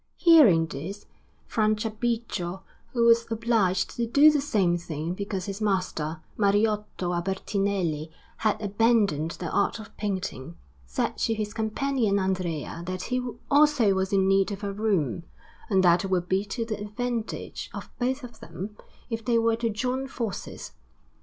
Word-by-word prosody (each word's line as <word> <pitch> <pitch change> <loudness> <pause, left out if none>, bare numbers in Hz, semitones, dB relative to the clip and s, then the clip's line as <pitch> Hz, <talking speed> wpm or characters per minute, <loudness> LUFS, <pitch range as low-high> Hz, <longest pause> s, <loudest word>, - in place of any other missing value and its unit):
Hearing 275 - +7
this, 165 +7 -7 0.4
Franciabigio, 215 -3 -1 0.3
who 235 -2 +2
was 230 0 +5
obliged 220 -5 +1
to 235 -1 0
do 285 +6 +7
the 295 -2 +1
same 200 -11 +2
thing 170 -1 -4
because 195 -1 -4
his 200 +1 -5
master 180 -6 -1 0.2
Mariotto 205 -3 +1
Albertinelli 190 -3 -1 0.3
had 215 -2 +1
abandoned 205 -6 +2
the 175 -3 -4
art 200 - +1
of 215 -1 -11
painting, 185 -7 -4 0.3
said 65 - -2
to 225 - +1
his 210 -1 -3
companion 220 -1 0
Andrea 180 -4 -2
that 185 0 -3
he 250 0 +1 0.3
also 285 -8 +5
was 190 0 -1
in 190 -1 +3
need 195 +1 +3
of 200 +1 -6
a 200 -1 -2
room, 195 - 0 0.5
and 190 -3 +3
that 175 0 +5
it - - -2
would 180 -2 0
be 190 +2 +1
to 230 +3 -3
the 215 -2 -4
advantage 230 +2 -4
of - - -8
both 260 +3 -1
of 240 -1 -10
them 185 +6 -7 0.4
if 225 0 -3
they 235 -1 +2
were 230 0 +2
to 230 0 0
join 255 +5 -2
forces. 230 -6 -5
205 Hz, 155 wpm, -26 LUFS, 185-230 Hz, 0.5 s, Hearing